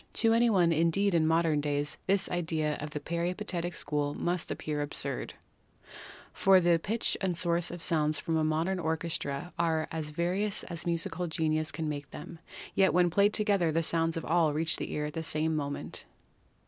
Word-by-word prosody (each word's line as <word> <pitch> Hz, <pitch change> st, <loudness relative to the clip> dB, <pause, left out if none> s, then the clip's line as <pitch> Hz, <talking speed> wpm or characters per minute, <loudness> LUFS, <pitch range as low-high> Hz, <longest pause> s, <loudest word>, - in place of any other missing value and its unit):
To 225 Hz, -1 st, +3 dB
any 235 Hz, +1 st, +4 dB
one 180 Hz, -6 st, +3 dB
indeed 170 Hz, +5 st, +2 dB
in 160 Hz, -2 st, +3 dB
modern 160 Hz, -2 st, +2 dB
days 145 Hz, +1 st, -2 dB
this 195 Hz, 0 st, +2 dB
idea 160 Hz, -3 st, -1 dB
of 150 Hz, -, -6 dB
the 150 Hz, -, -5 dB
peripatetic 175 Hz, +1 st, -3 dB
school 145 Hz, -1 st, -1 dB
must 175 Hz, 0 st, -1 dB
appear 150 Hz, -1 st, -3 dB
absurd, 140 Hz, -2 st, -4 dB, 1.0 s
for 195 Hz, -1 st, +5 dB
the 170 Hz, -1 st, +3 dB
pitch 220 Hz, +5 st, 0 dB
and 185 Hz, -3 st, 0 dB
the -, -, -5 dB
source 170 Hz, 0 st, +2 dB
of 175 Hz, -1 st, -6 dB
sounds 155 Hz, -2 st, +1 dB
from 165 Hz, -, -2 dB
a 160 Hz, -, +2 dB
modern 160 Hz, +5 st, 0 dB
orchestra 160 Hz, -1 st, -3 dB
are 160 Hz, -2 st, +1 dB
as 160 Hz, -2 st, -3 dB
various 180 Hz, +6 st, -1 dB
as 170 Hz, -1 st, -5 dB
musical 170 Hz, +1 st, -1 dB
genius 155 Hz, -1 st, 0 dB
can 160 Hz, -1 st, -4 dB
make 145 Hz, -1 st, -5 dB
them, 170 Hz, -, -9 dB, 0.3 s
yet 190 Hz, -5 st, +3 dB
when 175 Hz, -1 st, +4 dB
played 200 Hz, +4 st, +4 dB
together 200 Hz, -6 st, +1 dB
the 165 Hz, +2 st, +1 dB
sounds 165 Hz, 0 st, +2 dB
of 165 Hz, -, -4 dB
all 165 Hz, -2 st, +2 dB
reach 160 Hz, +1 st, +1 dB
the -, -, -5 dB
ear 150 Hz, -, -2 dB
at 150 Hz, -, -5 dB
the 165 Hz, -, -3 dB
same 160 Hz, 0 st, 0 dB
moment. 145 Hz, -1 st, -4 dB
165 Hz, 185 wpm, -30 LUFS, 155-175 Hz, 1.0 s, for